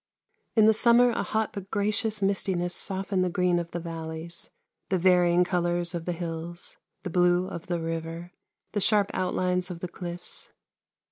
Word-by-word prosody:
In 220 -2 +6
the 220 - +7
summer 240 +2 +5
a - - -1
hot 220 0 -1
but 195 -1 -7
gracious 210 0 0
mistiness 185 -3 0
softened 190 -1 -1
the 180 - +1
green 180 0 +2
of 170 -1 -5
the 175 - -4
valleys, 165 0 -6 0.4
the 190 - +2
varying 180 -1 +4
colours 175 -1 0
of 170 -1 -4
the 180 - -1
hills, 170 0 -4 0.3
the 185 - -4
blue 180 +1 +3
of 170 -3 -7
the 175 -2 -1
river, 165 +1 -4 0.4
the 205 - -1
sharp 205 0 +3
out 185 -1 -1
lines 180 0 0
of 175 -2 -6
the 180 - -4
clifTs. 175 0 -6
180 Hz, 175 wpm, -27 LUFS, 170-195 Hz, 0.4 s, the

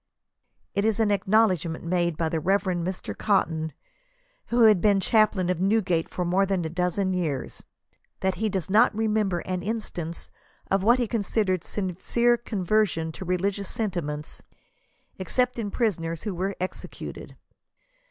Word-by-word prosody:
It 200 - 0
is 220 0 +1
an 215 -2 +3
ac 200 -2 0
knowledgement 185 -6 +2
often 170 - -6
made 170 -3 +1
by 165 - 0
"the 160 0 -1
Reverend 185 0 +1
Mr. 185 +1 -4
Cotton, 160 -6 0 0.8
who 235 0 +3
had 210 -5 +6
been 205 -2 +4
chaplain 210 -2 +3
of 180 -1 -2
Newgate 190 -5 +1
for 180 - -3
more 185 +3 +2
than 190 -3 0
a - - -2
dozen 180 +3 0
years," 155 -8 -3 0.6
that 190 0 +1
he 215 +4 -1
does 185 -5 -2
not 210 +1 +4
remember 210 -5 +1
an 185 -1 -3
instance 180 -5 -5 0.4
of 195 0 +3
what 235 +5 +5
he 245 -2 0
considered 200 -4 0
sincere 210 +5 +1
conversion 200 -6 0
to 185 - -8
religious 190 +2 -1
sentiments, 170 - -3 0.8
except 250 +7 0
in 210 -3 -2
prisoners 170 -8 -1
who 210 - -3
were 190 +3 -2
executed. 185 +1 -6
190 Hz, 150 wpm, -26 LUFS, 175-215 Hz, 0.8 s, had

